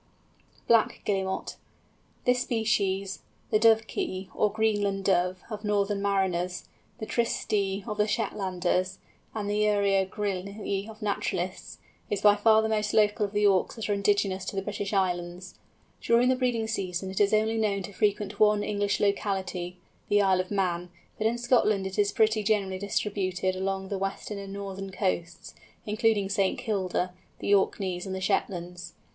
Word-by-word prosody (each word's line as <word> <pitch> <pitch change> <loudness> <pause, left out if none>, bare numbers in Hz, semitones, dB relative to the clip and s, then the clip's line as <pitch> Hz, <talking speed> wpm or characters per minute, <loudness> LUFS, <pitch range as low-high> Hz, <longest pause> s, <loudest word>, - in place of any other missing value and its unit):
BLACK 230 -2 +3
GUILLEMOT. 190 -2 -2 0.7
This 250 0 +3
species, 200 -5 0 0.3
the 215 - +4
Dovekey, 220 -4 +2
or 210 - +2
Greenland 205 -2 0
Dove, 180 -1 +1
of 215 -1 -6
northern 205 -1 0
mariners, 185 -3 0 0.3
the 220 - -5
Tysty 205 -4 0
of 210 -2 -4
the 210 - +3
Shetlanders, 185 -3 -1 0.4
and 210 -2 -3
the 205 +1 0
Uria 200 -2 +2
grylle 200 +1 -3
of 215 0 -10
naturalists, 185 -3 -2 0.3
is 205 - 0
by 205 -1 +7
far 220 +1 +4
the - - +1
most 215 -1 0
local 210 -1 +3
of - - -14
the 210 0 +2
Auks 195 -2 +3
that 225 -2 -5
are - - +3
indigenous 200 -1 +1
to - - -5
the 195 - -1
British 205 -1 -4
Islands. 180 -2 -2 0.4
During 235 +2 +4
the 260 - +4
breeding 245 -3 0
season 190 -3 -3
it 190 - -1
is 200 - +4
only 220 +1 +2
known 200 -3 0
to 200 - -8
frequent 205 +1 0
one 210 -1 +4
English 205 -1 0
locality, 190 -3 -1 0.3
the 205 - +4
Isle 190 -2 +3
of 185 - -9
Man; 180 -3 -1 0.3
but 215 - +2
in 235 +2 0
Scotland 235 -5 +2
it 190 +2 -4
is 200 -1 +3
pretty 220 0 +3
generally 200 -3 0
distributed 190 -2 -1
along 190 0 -2
the 200 - -2
western 195 +1 -4
and 195 0 -7
northern 195 -1 -6
coasts, 180 -3 -3 0.3
including 215 -2 +1
St. 195 -1 +1
Kilda, 185 -3 -1 0.2
the 205 - 0
Orkneys, 190 -2 +1
and 190 - -3
the - - -3
Shetlands. 180 -2 -2
200 Hz, 160 wpm, -28 LUFS, 190-210 Hz, 0.7 s, by